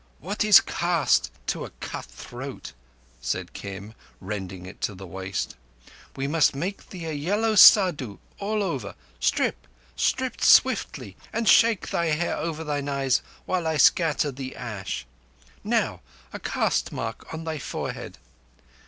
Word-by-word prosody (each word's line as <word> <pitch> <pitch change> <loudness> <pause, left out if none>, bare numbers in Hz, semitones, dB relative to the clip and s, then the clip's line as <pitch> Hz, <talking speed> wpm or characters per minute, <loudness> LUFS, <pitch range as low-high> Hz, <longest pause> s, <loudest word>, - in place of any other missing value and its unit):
"What 200 +7 -2
is 210 -1 +8
caste 170 -3 +1 0.2
to - - -2
a - - -7
cut - - -6
throat?" - - -9 0.5
said - - -3
Kim, 100 +2 -8 0.3
rending 95 -2 -6
it 95 - -11
to 105 - -2
the 95 +1 -9
waist. 95 -2 -4 0.6
"We 135 - -3
must 150 -1 +3
make 185 +8 -4
thee 175 -4 -7
a 160 - -3
yellow 205 +10 0
Saddhu 175 - +7 0.2
all 210 +1 -1
over. 135 - -3 0.2
Strip—strip - - -1
swiftly, 95 - +3
and 230 0 -2
shake 225 -3 +5
thy 170 - 0
hair 160 +2 0
over 160 -1 -3
thine 145 -2 -2
eyes 135 -2 +1 0.2
while 180 -3 -1
I 160 -1 0
scatter 150 0 +4
the 130 0 -7
ash. 100 - -5 0.6
Now, - - 0 0.3
a - - -5
caste - - 0
mark 115 0 -5
on 160 0 -5
thy 160 -2 -4
forehead." - - -5
145 Hz, 140 wpm, -25 LUFS, -, 0.6 s, is